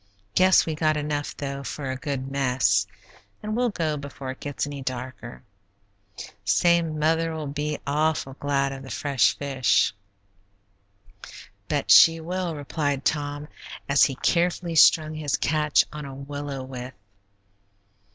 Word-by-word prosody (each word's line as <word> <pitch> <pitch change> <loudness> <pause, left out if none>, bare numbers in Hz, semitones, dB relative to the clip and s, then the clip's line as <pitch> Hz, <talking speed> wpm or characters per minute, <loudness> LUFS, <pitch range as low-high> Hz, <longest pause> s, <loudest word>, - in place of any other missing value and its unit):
Guess 185 0 +5
we 160 - -2
got 155 0 +1
enough, 145 -1 -3
though, 140 -1 -5
for 135 +2 -4
a - - -3
good 135 0 -4
mess, 125 -7 +2 0.6
and 215 0 -3
we'll 245 +1 +1
go 160 -7 -2
before 140 -2 -7
it 130 - -11
gets 145 -1 -3
any 145 -1 -7
darker. 130 - -6 1.0
Say, 170 - +3
mother'll 160 0 -1
be 150 +1 -3
awful 150 -1 0
glad 140 -1 0
of 135 0 -7
the 135 - -10
fresh 135 -4 +1
fish." 135 -7 +1 1.7
"Bet - - 0
she 165 0 +8
will," 175 0 -3
replied 145 -1 -2
Tom, 145 -1 -1 0.4
as 140 0 +4
he 135 - -2
carefully 175 +2 0
strung 155 0 +5
his 155 -2 -1
catch 150 0 +2
on 150 -1 -6
a 135 -1 -8
willow 140 0 -6
withe. 130 0 -8
145 Hz, 135 wpm, -25 LUFS, 135-155 Hz, 1.7 s, she